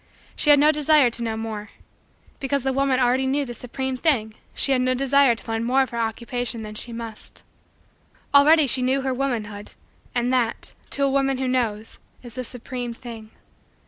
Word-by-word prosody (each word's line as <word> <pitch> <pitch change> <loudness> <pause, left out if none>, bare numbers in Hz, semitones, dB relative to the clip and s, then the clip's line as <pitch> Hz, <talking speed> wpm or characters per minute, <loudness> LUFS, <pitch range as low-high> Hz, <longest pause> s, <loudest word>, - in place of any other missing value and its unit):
She 295 - 0
had 290 - +8
no 300 +2 +5
desire 300 -4 +4
to 235 - +3
know 225 -1 -2
more. 220 -1 -5 0.7
Because 275 -1 -1
the 265 0 0
woman 270 -1 +1
already 255 +1 +2
knew 280 +2 0
the 240 - -7
supreme 260 +2 -4
thing, 250 -7 0 0.2
she 275 - +1
had 260 -2 +3
no 255 0 +1
desire 275 -1 +3
to 225 - -12
learn 225 0 -1
more 260 +3 +3
of 260 - -7
her 235 - -4
Occupation 235 +1 -3
than 215 0 -7
she 235 +3 -4
must. 230 -2 -7 0.9
Already 300 +2 +6
she 260 0 +3
knew 260 +2 +1
her 265 -1 -1
womanhood, 220 -6 -4 0.4
and 245 +1 +1
that, 240 -3 -1 0.2
to 280 - -1
a 275 - +2
woman 270 -1 +1
who 260 0 -2
knows, 225 -4 -2 0.2
is 240 -2 -8
the 255 - -4
supreme 245 0 -6
thing. 230 -3 -10
255 Hz, 190 wpm, -23 LUFS, 230-270 Hz, 0.9 s, had